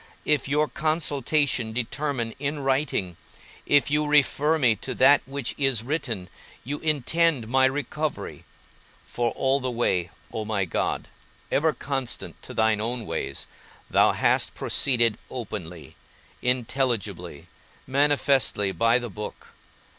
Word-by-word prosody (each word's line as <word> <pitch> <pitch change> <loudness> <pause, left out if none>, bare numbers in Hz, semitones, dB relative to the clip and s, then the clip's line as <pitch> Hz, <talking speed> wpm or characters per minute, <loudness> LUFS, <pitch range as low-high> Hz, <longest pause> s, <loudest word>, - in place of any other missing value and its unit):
If 150 -4 +2
your 150 +2 +2
consultation 145 -6 0
determine 125 0 -2
in 145 +1 -2
writing, 130 - 0 0.5
if 145 0 +4
you 150 0 +2
refer 150 +1 +3
me 125 -7 +3
to - - -5
that 140 +3 +6
which 135 -2 -4
is 135 -5 +1
written, 120 - -3 0.4
you 145 +4 -4
intend 155 -3 +1
my 130 +3 +4
recovery: 145 +3 -2 0.6
for 120 -1 -1
all 135 +1 +1
the 130 -1 -2
way, 95 -8 0 0.2
O 110 - -2
my 105 -3 -1
God 85 - -2 0.4
(ever 155 +3 +3
constant 135 -4 -4
to - - -10
thine 110 -1 +2
own 120 0 -3
ways), - - -4 0.5
thou - - +5
hast - - +1
proceeded 120 -5 +2
openly, 95 -9 -7 0.5
intelligibly, 125 -3 -1 0.4
manifestly 135 -7 +2
by 115 +4 +3
the 120 -1 -3
book. 105 +2 -8
130 Hz, 125 wpm, -25 LUFS, 115-145 Hz, 0.6 s, that